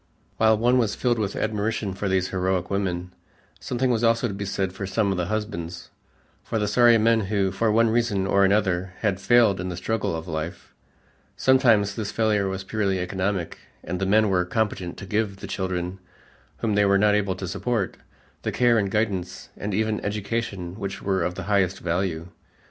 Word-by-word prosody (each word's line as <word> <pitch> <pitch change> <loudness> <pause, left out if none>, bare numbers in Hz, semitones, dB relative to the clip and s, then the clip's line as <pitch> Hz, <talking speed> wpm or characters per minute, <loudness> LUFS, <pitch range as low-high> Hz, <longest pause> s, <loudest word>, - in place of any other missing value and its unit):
While 110 -1 +4
one 120 +3 +3
was 110 -4 0
filled 120 -2 0
with 105 -2 -2
admiration 110 -1 -1
for 100 +1 -3
these 95 -1 +1
heroic 95 -1 -1
women, 90 -2 -2 0.5
something 125 0 -1
was 115 -1 0
also 115 +1 +3
to 100 - -5
be 100 +1 -4
said 95 -1 -2
for 95 0 -5
some 100 +1 +1
of 95 - -1
the 85 - -1
husbands, 95 -5 -4 0.5
for 115 - -3
the 105 -1 0
sorry 120 +2 +5
men 115 +1 +3
who, 100 -1 0
for 110 +3 +1
one 115 +2 +4
reason 115 -5 +1
or 100 0 +3
another, 95 -2 +1
had 100 -3 0
failed 105 -2 +4
in 90 - -3
the 90 - -5
struggle 95 -1 -1
of 80 +1 -6
life. 80 +2 -5 0.6
Sometimes 115 -6 +4
this 105 -2 -4
failure 105 -3 +1
was 95 0 -4
purely 100 -1 -1
economic 95 0 -2 0.2
and 90 +2 -4
the 95 - -1
men 105 +1 +4
were 90 -1 +3
competent 95 -2 -2
to 100 - -8
give 105 0 -1
the - - -8
children, 95 0 -3 0.6
whom 115 -2 0
they 105 0 +3
were 100 0 +4
not 105 +1 +4
able 100 -2 +1
to 95 0 -5
support, 110 +1 -2 0.5
the - - -2
care 120 -2 +3
and 100 -2 0
guidance 95 -3 -2
and 105 - -4
even 110 +2 -1
education 105 -3 -3
which 100 -1 -5
were 95 -2 0
of 90 +1 -1
the - - -5
highest 95 -3 +1
value. 85 -1 -2
100 Hz, 195 wpm, -24 LUFS, 95-110 Hz, 0.6 s, sorry